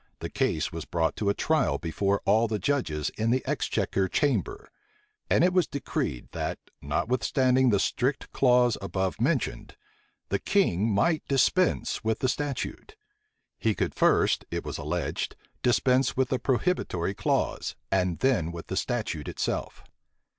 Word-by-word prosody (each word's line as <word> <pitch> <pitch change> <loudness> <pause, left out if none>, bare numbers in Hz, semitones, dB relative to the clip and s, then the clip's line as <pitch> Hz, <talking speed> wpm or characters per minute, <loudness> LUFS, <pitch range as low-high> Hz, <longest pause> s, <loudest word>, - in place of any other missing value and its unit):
the - - -6
case 85 +4 0
was 85 -2 -5
brought 80 -1 -1
to 100 - 0
a - - +3
trial 160 0 +1
before 100 +4 -1
all 110 +3 +4
the 110 -1 -1
judges 90 - -1
in 110 +1 +1
the 130 +2 +1
exchequer 95 -1 0
chamber; 390 - 0 0.6
and - - +4
it 180 0 +3
was 180 -2 +3
decreed, 135 - -3
that, - - -3 0.2
notwithstanding 130 - +2
the 100 -3 +3
strict 130 +7 -1
clause 125 -2 +3
above 95 +1 -2
mentioned, 130 - -1 0.5
the 100 - 0
king 115 - +2
might 155 - +2
dispense 145 +5 +2
with 110 0 0
the 130 - 0
statute: 145 - -4 0.6
he - - +1
could - - -1
first, - - +3
it - - -4
was - - -4
alleged, - - -3 0.3
dispense 125 0 +2
with 130 -1 +2
the 130 - 0
prohibitory 120 - 0
clause, - - -1 0.2
and 90 -3 +1
then 115 -12 +2
with 85 -1 -7
the 95 - -2
statute 110 - -2
itself. - - -3
120 Hz, 145 wpm, -27 LUFS, 95-135 Hz, 0.6 s, all